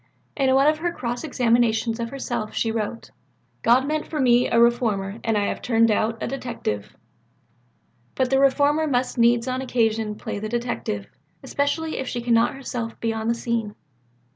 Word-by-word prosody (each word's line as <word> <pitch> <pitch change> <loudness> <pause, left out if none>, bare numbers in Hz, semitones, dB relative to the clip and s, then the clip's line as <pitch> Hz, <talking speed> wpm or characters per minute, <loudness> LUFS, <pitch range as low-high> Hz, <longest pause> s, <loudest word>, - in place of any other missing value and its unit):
In 265 -2 +2
one 270 +1 +4
of 305 +1 +3
her 345 +1 -1
cross 245 -5 -4
examinations 235 -4 +1
of 230 0 -3
herself, 240 -5 -4
she 225 - 0
wrote, 225 +1 -4 0.5
"God 250 +3 +4
meant 305 0 -2
me 250 -5 +3
for - - 0
a - - +5
reformer 225 -4 +2
and 225 -2 +1
I 205 - +1
have - - -3
turned 230 -2 +3
out 220 +1 0
a - - -1
detective." 235 - -4 1.2
But 260 -1 0
the 270 - +4
reformer 285 +3 +3
must 250 -3 -1
needs 235 +1 +4
on 255 0 -1
occasion 225 -4 0
play 205 - -5
the 215 +1 -4
detective 235 - -3 0.4
especially 315 +3 -1
if 265 - -4
she 245 - -3
cannot 235 +1 +2
herself 245 -4 -5
be 230 -1 -1
on 220 0 -3
the 235 - +2
scene. 230 -3 -2
235 Hz, 175 wpm, -23 LUFS, 225-265 Hz, 1.2 s, a